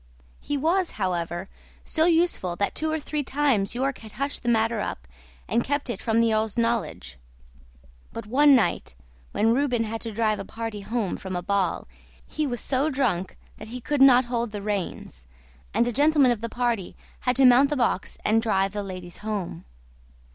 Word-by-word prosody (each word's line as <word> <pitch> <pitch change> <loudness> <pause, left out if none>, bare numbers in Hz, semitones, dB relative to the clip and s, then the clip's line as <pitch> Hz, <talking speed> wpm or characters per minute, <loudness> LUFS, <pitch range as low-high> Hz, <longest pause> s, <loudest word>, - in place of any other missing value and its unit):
He 290 - -3
was, 340 +5 +1
however, 175 -2 -2 0.4
so 320 0 +1
useful 330 - +1
that 200 +3 -1
two 315 0 -2
or 315 - -1
three 300 0 -3
times 260 -8 0
York 270 +2 -1
had 220 -2 -12
hushed 280 +2 -3
the 240 - -1
matter 225 -1 +2
up 65 - -5 0.4
and 235 +1 +1
kept 285 -2 -1
it - - -6
from 225 0 +1
the 230 -1 +3
earl's 215 0 -1
knowledge; 230 - -2 0.9
but 230 - -7
one 280 +5 +5
night, 185 - 0 0.4
when 225 +2 +2
Reuben 250 -3 +1
had 225 0 -4
to 230 - -3
drive 215 0 0
a - - -4
party 225 -2 -6
home 215 -2 -2
from 190 -1 -6
a 175 - -3
ball 195 -2 0 0.4
he 305 -1 -2
was 245 -3 -3
so 275 +3 0
drunk 240 - -1 0.2
that - - -9
he 245 +3 -6
could 285 +3 -1
not 260 -2 +7
hold 240 -1 -2
the 205 -1 -6
reins, 185 - -4 0.4
and 235 - +2
a - - 0
gentleman 285 0 +4
of 230 -3 -2
the 230 - -3
party 240 -6 -2 0.2
had 250 0 0
to 270 +1 +5
mount 255 +3 +6
the 295 - -1
box 240 -6 -1
and 225 +1 +3
drive 195 -4 +1
the 205 0 -3
ladies 185 -3 -8
home. 200 - -4
230 Hz, 190 wpm, -25 LUFS, 200-270 Hz, 0.9 s, not